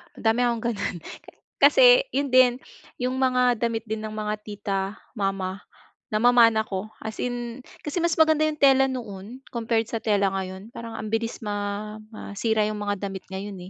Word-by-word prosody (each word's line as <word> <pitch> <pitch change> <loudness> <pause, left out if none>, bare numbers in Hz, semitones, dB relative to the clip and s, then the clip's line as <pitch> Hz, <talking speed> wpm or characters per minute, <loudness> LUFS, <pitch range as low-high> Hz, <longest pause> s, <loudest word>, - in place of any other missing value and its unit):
madami 225 +1 +1
akong 235 -2 -1
ganun. 200 -4 -3 0.6
Kasi, - - +7
yun 280 -1 -2
din, 255 -1 +6 0.4
yung 255 +1 -2
mga 250 -1 +3
damit 225 0 -2
din 220 0 -4
ng 215 0 -5
mga 210 0 -2
tita, 205 -2 -3 0.3
mama, 195 -2 -2 0.5
namamana 230 0 +5
ko. 195 +2 -5
As 220 0 -6
in, 245 0 -4 0.2
kasi 295 - -6
mas 340 - +2
maganda 315 -1 +5
yung 310 -1 -2
tela 270 -1 +6
noon 230 -2 -7
compared 230 -1 -1
sa 230 - -3
tela 205 -3 +2
ngayon. 190 +2 -5
Parang 230 -1 -8
ang 215 0 -5
bilis 225 +1 -2
ma 205 0 -4 0.2
masira 215 +1 -1
yung 215 - -3
mga 205 -1 -2
damit 195 -1 -7
ngayon 195 +1 -5
220 Hz, 160 wpm, -25 LUFS, 205-245 Hz, 0.6 s, Kasi